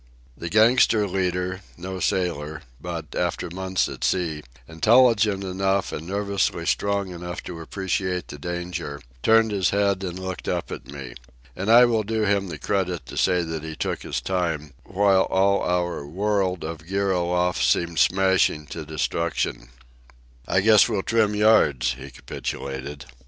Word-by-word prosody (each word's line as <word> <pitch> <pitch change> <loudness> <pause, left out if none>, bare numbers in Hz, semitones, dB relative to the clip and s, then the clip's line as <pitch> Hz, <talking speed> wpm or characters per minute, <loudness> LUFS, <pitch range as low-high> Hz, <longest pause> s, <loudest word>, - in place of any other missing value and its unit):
The 85 - -6
gangster 110 0 +4
leader, 90 0 -1 0.2
no 95 +2 -6
sailor, 80 -5 -1 0.2
but, 85 -2 -6
after 90 0 -2
months 95 +1 -1
at - - -7
sea, 80 -5 0 0.3
intelligent 105 +3 +4
enough 95 +1 0
and 80 +2 -6
nervously 100 +1 -1
strong 100 -2 0
enough 90 0 -6
to 85 -2 -7
appreciate 95 +1 -2
the 75 - -8
danger, 85 -3 -4 0.2
turned 110 - +4
his 95 -3 +1
head 100 -1 +1
and 90 -1 -4
looked 95 -1 -6
up - - -2
at - - -7
me. 70 -4 -8 0.4
And 100 +4 -3
I 120 +2 +8
will 115 -2 +2
do 110 +1 -1
him 100 -1 +1
the 80 -4 -6
credit 90 +1 -2
to - - -9
say 90 -2 +2
that 80 -1 -4
he 80 0 -6
took - - -3
his - - -3
time 80 -6 -2
while 95 -1 +3
all 100 +1 +3
our 90 -3 -1
world 95 +1 0
of 80 0 -7
gear 100 +1 0
aloft 90 -5 +1
seemed 80 +5 +1
smashing 95 -2 +3
to 80 - -5
destruction. 80 -3 -2 0.8
"I 95 - +2
guess 110 +2 +6
we'll 100 -4 -1
trim 110 -2 +2
yards," 80 - +4
he 70 +2 -10
capitulated. 65 +2 -6
90 Hz, 155 wpm, -24 LUFS, 80-100 Hz, 0.8 s, I